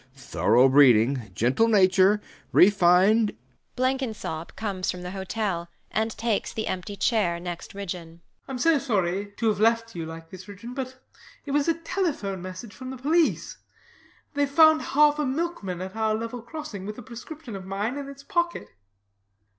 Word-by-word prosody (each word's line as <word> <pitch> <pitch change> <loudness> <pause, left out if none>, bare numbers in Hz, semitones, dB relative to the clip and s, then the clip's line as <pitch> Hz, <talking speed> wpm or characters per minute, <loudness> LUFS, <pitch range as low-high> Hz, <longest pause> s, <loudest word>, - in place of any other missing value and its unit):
Thorough 125 -2 +3
breeding! 130 -4 +4
Gentle 130 - +2
nature! 195 -1 +4 0.3
Refined 195 - +5 0.4
Blenkinsop 250 -11 -2
comes 195 -4 -3
from 180 0 -3
the 180 - -5
hotel 190 -2 -3 0.2
and 220 +1 0
takes 225 0 -1
the 220 - -3
empty 185 +3 -4
chair 185 -3 +1
next 175 +1 -7
Ridgeon. 175 -4 -6
BLENKINSOP. 170 - -36
I'm 265 - -4
so 315 +4 +3
sorry 200 -6 0
to 230 - 0
have 205 -2 -1
left 230 +1 +2
you 165 -2 -5
like 165 0 -10
this, 185 0 -10
Ridgeon; 205 +5 -9
but 260 -1 -6 0.5
it 285 - -5
was 290 +1 +1
a 330 - +3
telephone 325 - -2
message 185 +4 -8
from 255 0 -8
the 260 - -6
police. 310 +6 +1 0.8
Theyve 285 -1 +1
found 315 +1 +6
half 295 +1 +3
a 300 - +1
milkman 260 - -3
at 190 +2 -6
our 220 -1 +1
level 230 +2 -5
crossing 235 -7 -7
with 210 - -6
a 245 - -9
prescription 250 +1 -9
of 190 -1 -8
mine 205 +6 -2
in 280 -1 -6
its 280 0 -11
pocket. 345 0 -1
215 Hz, 165 wpm, -26 LUFS, 185-265 Hz, 0.8 s, found